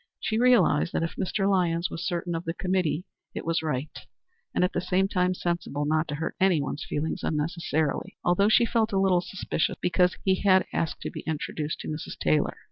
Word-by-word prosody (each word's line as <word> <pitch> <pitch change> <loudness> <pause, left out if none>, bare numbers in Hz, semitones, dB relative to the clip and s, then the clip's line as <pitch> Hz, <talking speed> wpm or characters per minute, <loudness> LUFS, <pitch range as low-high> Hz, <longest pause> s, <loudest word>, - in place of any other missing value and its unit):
She 220 +3 -1
realized 240 -11 +4
that - - 0
if 165 - -3
Mr. 195 +1 -1
Lyons 175 -3 +1
was 165 - -5
certain 175 -1 -2
of 165 +1 -3
the 165 +1 -3
committee, 180 -2 0 0.3
it - - -5
was 165 0 +1
right, 150 -2 -2 0.6
and - - +1
at 180 - +1
the - - 0
same 185 +2 +1
time 180 -1 +1
sensible, 170 -5 -2
not 155 +2 +1
to 145 - -3
hurt 160 +3 -3
anyone's 160 -7 +1
feelings 150 +2 -3
unnecessarily 155 -1 -1
although 190 +4 +3
she 235 +2 +5
felt 225 -1 +1
a 195 - +3
little 190 -2 +3
suspicious 180 -3 -2
because 180 0 +2
he 190 -1 +2
had 190 -2 +5
asked 165 - -2
to - - -4
be - - -6
introduced 155 -1 -3
to - - -7
Mrs. 155 0 -5
Taylor. 75 0 +1
175 Hz, 200 wpm, -27 LUFS, 160-190 Hz, 0.6 s, she